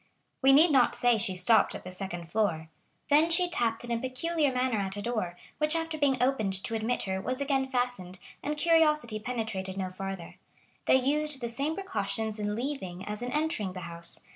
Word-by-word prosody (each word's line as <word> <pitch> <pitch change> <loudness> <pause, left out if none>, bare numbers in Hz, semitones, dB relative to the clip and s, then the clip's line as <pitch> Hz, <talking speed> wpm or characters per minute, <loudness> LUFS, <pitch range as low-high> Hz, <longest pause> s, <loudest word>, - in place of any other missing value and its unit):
We 270 0 +6
need 310 +5 +6
not 260 -4 +4
say 245 -2 +3
she 190 -2 +2
stopped 205 +4 +4
at - - -7
the 185 - -7
first 175 -3 -6
floor. 175 -7 0 0.4
Then 305 +3 +5
she 355 +2 +5
tapped 235 -10 -1
in 240 - -5
a 230 - 0
peculiar 285 +4 0
manner 250 -3 0
at 195 0 -2
a - - -3
door, 205 -7 -2 0.2
which 305 +1 +4
after 325 -1 -1
being 285 -3 +2
opened 245 -6 +1
to - - -3
admit 225 +2 -1
her 190 -1 -2
was 255 +5 -3
again 275 -1 0
fastened, 245 -8 -2 0.2
and 300 +1 -3
curiosity 300 -8 +3
penetrated 215 -5 -3
no 185 -1 -3
farther. 190 -2 -7 0.5
They - - +5
used 290 +2 +1
the 240 - -3
same 280 +7 -1
precautions 225 - -2
in 210 0 -2
leaving 215 -8 -4
as 210 +1 -5
in 245 0 -3
entering 295 -11 -1
the 185 - -7
house. 170 0 -2
240 Hz, 195 wpm, -29 LUFS, 195-285 Hz, 0.5 s, We